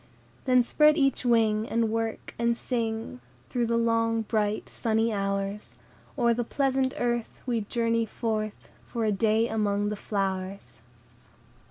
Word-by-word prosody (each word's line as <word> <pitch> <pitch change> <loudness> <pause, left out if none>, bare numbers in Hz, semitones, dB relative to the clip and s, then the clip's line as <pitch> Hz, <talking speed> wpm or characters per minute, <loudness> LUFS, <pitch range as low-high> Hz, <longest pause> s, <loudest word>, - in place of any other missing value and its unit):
Then 255 -1 +5
spread 300 +5 +4
each 275 -3 +1
wing, 225 -2 +3
And 225 -1 +1
work, 225 0 -3
and 235 0 +2
sing, 225 - -3 0.3
Through 240 -2 0
the 230 0 +1
long, 230 -1 +1
bright 215 -1 -1
sunny 225 -1 0
hours; 200 +1 -3 0.4
O'er 235 -1 +3
the 240 +1 -1
pleasant 265 +1 0
earth 240 -1 -2
We 240 -3 0
journey 230 +1 0
forth, 215 -2 -3 0.2
For 230 -2 -2
a 215 - +2
day 220 +3 +2
among 205 -2 0
the 210 - -2
flowers!" 195 - -3
225 Hz, 140 wpm, -27 LUFS, 210-235 Hz, 0.4 s, Then